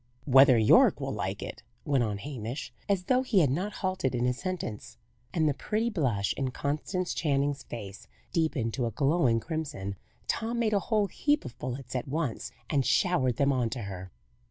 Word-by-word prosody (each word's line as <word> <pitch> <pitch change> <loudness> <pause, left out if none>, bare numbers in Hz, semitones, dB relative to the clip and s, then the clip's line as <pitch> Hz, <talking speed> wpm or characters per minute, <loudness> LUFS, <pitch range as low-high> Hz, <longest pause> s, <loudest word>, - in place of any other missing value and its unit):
" - - -33
Whether 135 -2 +9
Yorke 110 -1 +6
will - - -3
like - - -3
it," - - -7 0.2
went 135 -4 +2
on 105 -3 -1
Hamish, 130 +2 -6 0.2
as 195 -2 +2
though 255 +7 +3
he 235 -7 +3
had 140 -5 +3
not 185 +9 -1
halted 185 -9 0
in 120 0 +1
his 125 0 0
sentence. 120 - -5 0.3
And 160 +1 +2
the 145 - +2
pretty 220 - -1
blush 120 - 0
in 135 -2 -1
Constance 155 +8 -2
Channing's 145 -2 0
face 110 -1 -8 0.3
deepened 155 -9 0
to 125 -3 0
a - - -3
glowing 135 -5 +2
crimson. 135 - -4 0.3
Tom 230 +2 -1
made 225 -2 +1
a 200 - +4
whole 215 -3 +3
heap 290 - 0
of 120 - -7
bullets 130 +1 -5
at 125 - -2
once, 140 -4 -2 0.2
and 140 -3 +1
showered 130 - +2
them 140 +2 +2
on 125 -3 +1
to 120 - -4
her. 95 -2 -7
140 Hz, 190 wpm, -29 LUFS, 120-180 Hz, 0.3 s, Whether